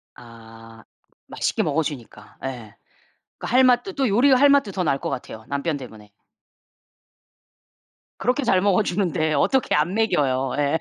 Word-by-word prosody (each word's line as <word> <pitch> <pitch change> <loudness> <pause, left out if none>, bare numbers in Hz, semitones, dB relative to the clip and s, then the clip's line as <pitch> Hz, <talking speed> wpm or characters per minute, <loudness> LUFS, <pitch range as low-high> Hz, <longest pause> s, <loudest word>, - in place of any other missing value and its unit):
아. 115 -1 -15 0.5
맛있게 - - -1
먹어 155 +2 0
주니까 135 -6 -9
예. 120 -5 -7 0.6
그 - - -7
할 255 +2 +4
맛도 255 +10 +2
또 270 -3 0
요리할 265 +5 +4
맛도 275 -8 +3
더 185 - -2
날 140 -3 +1
것 - - -4
같아요 110 -3 -7
남편 140 +2 -2
때문에. 110 -5 -12 2.1
그렇게 255 +4 -1
잘 190 -6 +2
먹어 200 +1 +2
주는데 175 -5 -1
어떻게 245 - +1
안 155 +5 0
먹여요. 135 - 0
예. 145 +3 +1
155 Hz, 265 characters per minute, -22 LUFS, -, 2.1 s, 할